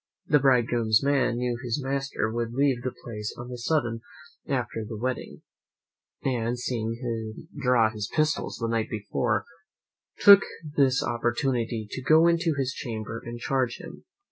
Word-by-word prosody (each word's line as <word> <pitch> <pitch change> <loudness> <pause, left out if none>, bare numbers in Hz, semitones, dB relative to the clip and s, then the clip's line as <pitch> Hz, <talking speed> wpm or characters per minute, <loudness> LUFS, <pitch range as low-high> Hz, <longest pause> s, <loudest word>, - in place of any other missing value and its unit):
The 150 - +4
bridegroom's 120 -4 +3
man 140 -4 +2
knew 120 -1 -1
his 120 +3 -1
master 135 -4 -2
would 115 0 -2
leave 135 -2 +2
the 130 - -2
place 105 -3 -5
on 120 +1 -8
a 125 - -5
sudden 120 -4 0 0.5
after 120 -4 -2
the 110 0 -6
wedding, 130 +3 -4 0.8
and 120 -2 0
seeing 115 -2 -2
him 115 +2 -5
draw 125 -4 +4
his 105 -2 -5
pistols 155 -1 0
the 115 - -1
night 115 -1 -1
before, 110 +2 -1 0.7
took 200 -1 +9 0.3
this 135 -2 +3
opportunity 120 -1 -1
to 130 - -4
go 160 +5 +5
into 170 -2 +2
his 130 -1 -1
chamber 115 -2 -5
and 120 0 -6
charge 130 -2 0
them. - - -11
120 Hz, 150 wpm, -26 LUFS, 115-135 Hz, 0.8 s, took